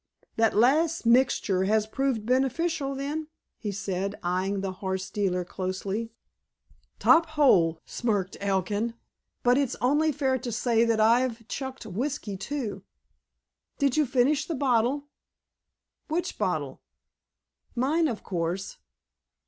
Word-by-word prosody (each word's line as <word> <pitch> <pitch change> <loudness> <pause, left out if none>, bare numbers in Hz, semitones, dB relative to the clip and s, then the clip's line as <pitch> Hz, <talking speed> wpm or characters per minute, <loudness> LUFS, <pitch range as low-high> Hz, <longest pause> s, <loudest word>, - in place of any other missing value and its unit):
"That 225 -1 +2
last 305 +8 +3
mixture 235 -6 +3
has 215 +1 +2
proved 240 -1 -1
beneficial, 275 +4 0
then?" 295 +3 -3 0.3
he 210 - -3
said, 195 0 -3
eying 190 +2 0
the 195 -1 -2
horse 190 -1 -3
dealer 185 -4 0
closely. 190 +5 -3 0.9
"Top 330 0 +5
hole," 195 - +4
smirked 205 -6 -1
Elkin. 205 +4 -1 0.5
"But 245 +2 +4
it's 275 -4 0
only 295 +7 +3
fair 265 -2 0
to 245 -1 -5
say 230 0 +2
that 230 -1 +1
I've 230 +1 +2
chucked 265 -1 -5
whiskey, 220 +1 -3
too." 235 +2 -4 0.9
"Did 280 -3 +2
you 305 -2 +3
finish 265 +3 +2
the 330 - -2
bottle?" 260 +1 +1 1.0
"Which 330 +3 -2
bottle?" - - -2 0.9
"Mine, 300 +7 +2
of 230 -6 -4
course." 175 +1 -3
235 Hz, 120 wpm, -27 LUFS, 200-275 Hz, 1.0 s, Top